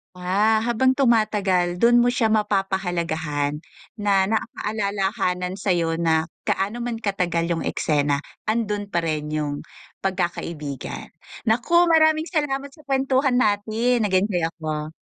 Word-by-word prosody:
Ah, 205 +5 +2
habang 240 +3 +2
tumatagal 205 -8 +2
dun 235 +6 +5
mo 240 - +4
siya 245 -3 +1
mapapahalagahan, 175 -8 -1 0.4
na 200 -2 +3
nakakaalalahanan 200 -3 -2
sayo 170 -3 0
na 160 -1 +2 0.2
gaano 205 +5 -1
man 240 -1 -3
katagal 175 -4 0
yung 165 - 0
eksena 145 -1 0 0.2
andun 210 -2 -1
pa 170 -3 -1
rin 155 -2 -2
yung 150 -1 -2 0.4
pagkakaibigan, 170 -7 -4 0.3
naku 255 +11 +3
maraming 315 -1 +4
salamat 280 -4 -1
sa 305 -1 -19
kwentuhan 265 -1 +2
natin 220 +1 +1
nagenjoy 185 -3 +1
ako. 155 -2 -4
200 Hz, 115 wpm, -23 LUFS, 170-235 Hz, 0.4 s, dun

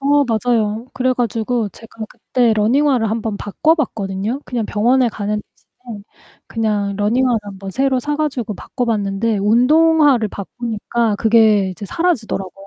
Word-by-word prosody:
어 285 +1 +3
맞아요. 225 -1 0
그래 255 0 +1
가지고 235 -1 -1
제가 225 +1 -10
그때 245 -3 0
러닝화를 245 +2 +2
한번 220 -1 -2
바꿔봤거든요. 220 - -1
그냥 235 -4 -3
병원에 240 +5 +2
가는 210 -1 -3
대신에 230 -1 -13 0.5
그냥 210 -3 -1
러닝화를 235 +4 +1
한번 195 -1 -8
새로 265 +2 +1
사 295 +3 -2
가지고 265 -9 -2
바꿔봤는데 220 -3 -2
운동화를 260 +3 +4
바꾸니까 225 +1 -3
그게 220 -3 +4
이제 185 +3 -8
사라지더라고요. 215 - -2
225 Hz, 345 characters per minute, -18 LUFS, 210-255 Hz, 0.5 s, 운동화를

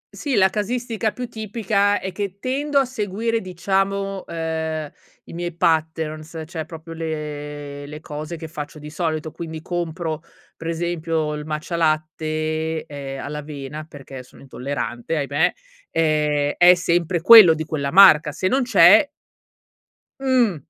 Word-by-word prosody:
Sì, 280 -4 -2
la 190 -2 +4
casistica 225 +1 -2
più 250 +2 -6
tipica, 210 -2 0
è 190 - -5
che 200 0 -4
tendo 280 +5 -1
a 275 - +5
seguire, 230 -1 -2
diciamo, 195 +2 -1
ehm, 160 -2 -3 0.3
i - - -13
miei 175 0 -4
patterns, 160 0 -1
cioè, 160 -1 -6
proprio 165 0 -10
le 150 -3 -6
le 150 +1 -8
cose 155 +2 -6
che 160 - -7
faccio 155 -1 -7
di 150 0 -9
solito. 155 -2 -2
Quindi, 160 -2 -7
compro, 165 -2 -3 0.3
pre 165 - -6
esempio, 165 -2 -1
il 150 0 -6
Matcha 155 +3 -4
Latte, 155 0 -1
ehm, 135 -2 -7
all'avena, 150 0 -6
perché 135 -3 -10
sono 125 - -17
intollerante, 130 +1 -4
ahimè, 145 +2 +1 0.4
ehm, 150 -2 +1
è 180 0 +9
sempre 175 0 0
quello, 200 -6 +9
di 155 0 -4
quella 140 -3 -3
marca. 160 -5 +7
Se 185 - -1
non 265 +8 +2
c'è 245 -1 +6 1.1
mh, 255 -8 +2
160 Hz, 140 wpm, -22 LUFS, 150-190 Hz, 1.1 s, è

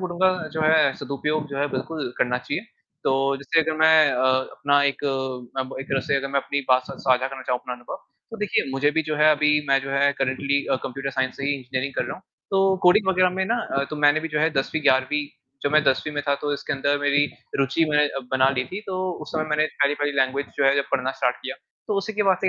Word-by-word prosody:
बोलूँगा, 185 +2 +2 0.2
जो 160 - -3
है, 155 -3 +4
सदुपयोग 150 +2 -2
जो 140 0 -5
है, 145 - +1
बिल्कुल 150 -7 -4
करना 125 0 +1
चाहिए। 160 - -4 0.4
तो - - +2 0.2
जैसे 140 +4 +1
अगर 160 0 -2
मैं 160 -1 +6
अ, 130 +1 0 0.3
अपना 145 0 +2
एक 140 +1 -1 0.5
अब 130 0 -3
एक 135 - -7
तरह 135 - +1
से 140 - 0
अगर 135 0 -2
मैं 140 0 +1
अपनी 140 +1 -2
बात 130 0 +4
स - - -6
साझा 130 -1 +2
करना 135 -1 -8
चाहूँ 125 -1 -1
अपना 125 -1 -6
अनुभव, 120 0 -8 0.3
तो 225 - -7
देखिए, 210 -2 0
मुझे 140 +2 +2
भी, 160 +1 0
जो 155 -1 -3
है, 155 +1 +5
अभी 150 0 +3 0.2
मैं, 135 0 +4
जो 135 - -6
है, 140 +1 +3
करंटली 140 +2 0
अ, - - +3
कंप्युटर 135 +1 -4
साइंस 130 0 -2
ही 140 - -1
इंजीनियरिंग 130 0 -4
कर - - -1
रहा - - -5
हूँ। 185 - -17 0.3
तो 195 -1 +3
कोडिंग 190 +2 +5
वगैरह 185 -1 +3
में 190 +1 -1
ना, 230 +3 +1 0.3
तो 155 - -4
मैंने 150 +1 +4
भी, 165 - -4
जो 150 -1 -2
है, 160 +1 +3
10वीं 150 +2 -1
ग्यारहवीं 145 +1 +2 0.4
जब 145 - 0
मैं 155 0 +5
10वीं 135 +4 +1
में 145 - -2
था, 140 - +4
तो 145 +1 -3
इसके 140 - -3
अंदर 140 +1 0
मेरी 145 0 +3 0.3
रुचि 140 +4 +2
मैंने 150 0 +3 0.2
बना 130 0 +3
ली 125 -2 -1
थी। 195 +3 -6
तो 190 - -3 0.3
उस - - -9
समय 155 -1 -1
मैंने 150 0 +2 0.2
पहली 140 +1 +3
पहली 145 0 -1
लैंग्वेज 135 +1 +1
जो - - +1
है, 135 0 +5
जब 140 - +1
पढ़ना 130 0 +1
स्टार्ट 125 0 +1
किया, 130 - -5 0.3
तो 210 - 0
उसी 210 +2 -4
के 210 0 0
बाद 190 -2 +3
से, 190 - +2
145 Hz, 250 wpm, -23 LUFS, 135-155 Hz, 0.5 s, मैं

